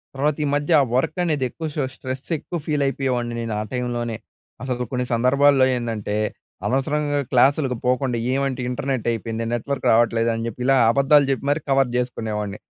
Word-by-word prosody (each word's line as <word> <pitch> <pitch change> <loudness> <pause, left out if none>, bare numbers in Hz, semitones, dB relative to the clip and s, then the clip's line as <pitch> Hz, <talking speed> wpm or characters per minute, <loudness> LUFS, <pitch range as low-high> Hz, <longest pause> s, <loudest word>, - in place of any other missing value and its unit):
తర్వాత 145 +2 +1
ఈ - - 0
మధ్య 145 +3 -1 0.2
వర్క్ 155 +6 0
అనేది 150 -6 0
ఎక్కువ 160 +6 -7
షా 150 - 0
స్ట్రెస్ 130 +5 -6
ఎక్కువ 175 - -5
ఫీల్ 150 -2 0
అయిపోయేవాడిని 125 -3 -1
నేను 115 -2 -3
ఆ - - -1
టైమ్‌లోనే. 120 -2 -2 0.5
అసలు 125 -1 -2
కొన్ని 125 -1 -1
సందర్భాల్లో 135 +3 +4
ఏందంటే, 115 -4 -3 0.5
అనవసరంగా 145 +4 0
క్లాసులకు 135 +1 +3
పోకుండా 125 -1 +1
ఏమంటే 135 -1 -1
ఇంటర్నెటైపోయింది, 115 -3 -2
నెట్వర్క్ 140 +4 -3
రావట్లేదు 115 0 +3
అని 115 0 -3
చెప్పి 115 +2 -7
ఇలా 135 - +4
అబద్ధాలు 140 +3 +4
చెప్పి 135 0 -1
మరి 145 +2 +2
కవర్ 135 -1 +3
చేసుకునేవాడిని. 110 -4 -3
130 Hz, 155 wpm, -22 LUFS, 120-140 Hz, 0.5 s, సందర్భాల్లో